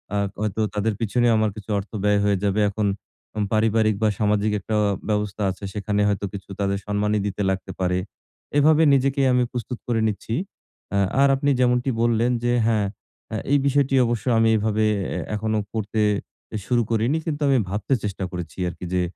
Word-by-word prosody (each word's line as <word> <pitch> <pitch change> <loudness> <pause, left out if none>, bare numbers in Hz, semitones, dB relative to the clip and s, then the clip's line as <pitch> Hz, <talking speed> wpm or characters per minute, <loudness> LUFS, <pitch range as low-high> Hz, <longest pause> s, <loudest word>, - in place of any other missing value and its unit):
আ - - +1 0.2
হয়তো 105 0 -1
তাদের 105 +1 0
পিছনে 120 +2 +1
আমার 110 0 +2
কিছু 110 -1 -10
অর্থ 100 - -9
ব্যয় 105 0 +3
হয়ে 100 -1 +2
যাবে। 100 +1 +1
এখন 105 +1 -1 0.5
হুম 105 - -1
পারিবারিক 110 0 +3
বা, 110 - +4
সামাজিক 105 0 +2
একটা 110 +3 -3 0.3
ব্যবস্থা 105 -1 -1
আছে, 95 +2 -12
সেখানে 105 0 -1
হয়তো 100 0 0
কিছু 100 -1 -8
তাদের 100 0 0
সম্মানি 105 +1 +1
দিতে 100 0 -3
লাগতে 95 0 -3
পারে। 90 -1 +1 0.6
এভাবে 155 +2 +5
নিজেকেই 135 0 +2
আমি 125 0 +3
প্রস্তুত 125 0 -5
করে 120 -2 +1
নিচ্ছি। 110 +1 -3 0.6
আ - - +3 0.2
আর 140 - +6
আপনি 140 +1 0
যেমনটি 125 +1 +2
বললেন 120 +1 +2
যে, 120 - +2 0.2
হ্যাঁ, 110 -3 +2 0.5
এ - - -1
এই 145 - +6
বিষয়টি 140 -1 +2
অবশ্য 120 +2 -2
আমি 115 0 +4
এভাবে 110 0 0 0.3
এ - - -2 0.2
এখনো 110 0 -1
করতে 110 0 -1 0.5
এ - - 0
শুরু 120 +1 +3
করিনি 115 +7 +2
কিন্তু 155 -2 -3
আমি 135 - +4
ভাবতে 105 +6 -1
চেষ্টা 100 -2 -3
করেছি 90 -4 -6
আরকি। 85 +1 -8
যে 90 - +2
110 Hz, 180 wpm, -23 LUFS, 105-120 Hz, 0.6 s, আর